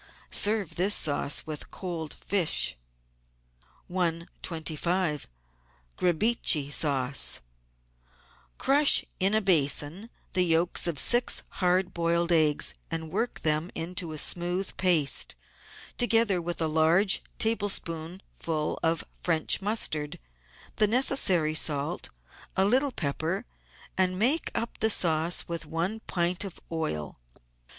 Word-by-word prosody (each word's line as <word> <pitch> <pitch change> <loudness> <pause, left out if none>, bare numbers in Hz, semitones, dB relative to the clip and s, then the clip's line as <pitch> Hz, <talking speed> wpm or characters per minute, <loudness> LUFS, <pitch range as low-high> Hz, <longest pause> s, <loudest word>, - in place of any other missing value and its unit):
Serve 205 -5 0
this 195 +4 +3
sauce 145 -2 -1
with 155 -2 -6
cold 170 -5 -6
fish. 170 - +1 1.1
125 170 -2 -2 0.7
QRIBICHE 175 -5 +1
SAUCE 140 -3 +2 1.2
Crush 285 +1 +4
in 195 +3 +3
a 220 - +2
basin 170 +2 +1 0.2
the 185 - +2
yolks 170 0 +1
of 165 -4 -2
six 240 - +2 0.2
hard 185 +1 +1
boiled 170 0 0
eggs, 155 -3 +3 0.2
and 160 -1 -4
work 225 +6 -3
them 155 +2 +1
into 170 0 -2
a 155 - -6
smooth 175 +4 +1
paste, 165 -7 +2 0.6
together 225 -6 +2
with 170 0 -4
a 160 - 0
large 160 +5 +3 0.2
tablespoon 190 -5 -1
ful 155 -2 -3
of 165 0 +1
French 165 +1 0
mustard, 155 -8 0 0.6
the 215 - +3
necessary 205 - +3
salt, 145 -2 -1 0.5
a 190 - +3
little 260 +6 +2
pepper, 165 - -3 0.5
and 185 -1 +1
make 260 - +2
up 230 - -4
the 220 - +2
sauce 165 -3 +2
with 170 -2 -5
one 175 +8 -3
pint 175 +1 -1
of 195 -4 -8
oil. 80 - -4
175 Hz, 110 wpm, -27 LUFS, 160-195 Hz, 1.2 s, Crush